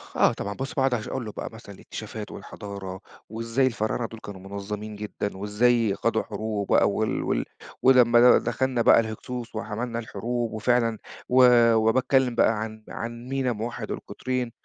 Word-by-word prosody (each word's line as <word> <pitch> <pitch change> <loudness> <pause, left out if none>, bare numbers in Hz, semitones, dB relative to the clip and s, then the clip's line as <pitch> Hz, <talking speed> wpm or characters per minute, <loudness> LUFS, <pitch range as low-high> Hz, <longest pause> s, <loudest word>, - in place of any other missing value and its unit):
آه - - +4
طبعًا، 100 0 -4
بُص 135 +4 -5
باقعُد 135 -2 +2
أش 115 -3 -2
أقول 130 -3 -4
له 105 - -5
بقى - - -6
مثلًا 110 -3 -11
الاكتشافات، - - -8
والحضارة، 95 -2 -8 0.3
وإزاي 115 +4 0
الفراعنة 115 0 -1
دول 115 - -11
كانوا 100 -4 -9
منظَّمين 105 +1 -5
جدًا، 105 -1 -5
وإزاي 105 +1 +2
خاضوا 110 0 0
حروب 105 -1 -3
بقى، - - +4
وال - - -1
وال - - 0 0.4
ولمّا 125 -2 +6 0.2
د - - -11
دخلنا 130 -2 0
بقى 115 - +7
الهكسوس 115 +2 -5
وحمَلنا 115 +2 -3
الحروب، 115 +2 -3
وفعلًا 115 0 +1 0.3
و 125 -2 +6
وباتكلَّم 125 +3 +3
بقى 115 -2 +3
عن 110 0 -6
عن 120 +2 -6
مينا 135 -2 0
موحِّد 115 +1 -4
القطرين، 125 -2 -3
115 Hz, 160 wpm, -25 LUFS, 105-125 Hz, 0.4 s, بقى